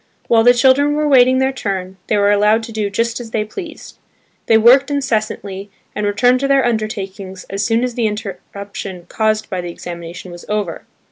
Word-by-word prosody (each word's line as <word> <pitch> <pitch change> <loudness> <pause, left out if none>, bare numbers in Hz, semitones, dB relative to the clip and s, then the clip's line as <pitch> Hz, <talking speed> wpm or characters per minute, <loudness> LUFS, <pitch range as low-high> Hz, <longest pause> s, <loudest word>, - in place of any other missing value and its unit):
While 225 -1 +4
the 245 +1 +6
children 275 +3 +4
were 300 0 0
waiting 260 -2 +5
their 265 +1 +2
turn, 190 -6 -4
they 210 - +1
were 205 0 +3
allowed 210 +2 +3
to 225 - -8
do 215 -2 -2
just 230 +4 -1
as 235 -2 -8
they 215 -1 -1
pleased. 330 - -9 0.5
They 225 - +5
worked 250 +6 +5
incessantly, 215 -7 -2 0.2
and 210 -1 -2
returned 245 +5 +3
to 275 - 0
their 275 -2 +3
undertakings 200 -4 -4
as 200 +1 -2
soon 230 +3 +1
as 250 -1 -2
the 230 -2 0
interruption 200 -3 -7
caused 220 0 0
by 185 -1 -2
the 175 - -6
examination 170 +1 -8
was 175 0 -10
over. 210 -5 -3
215 Hz, 190 wpm, -17 LUFS, 200-245 Hz, 0.5 s, the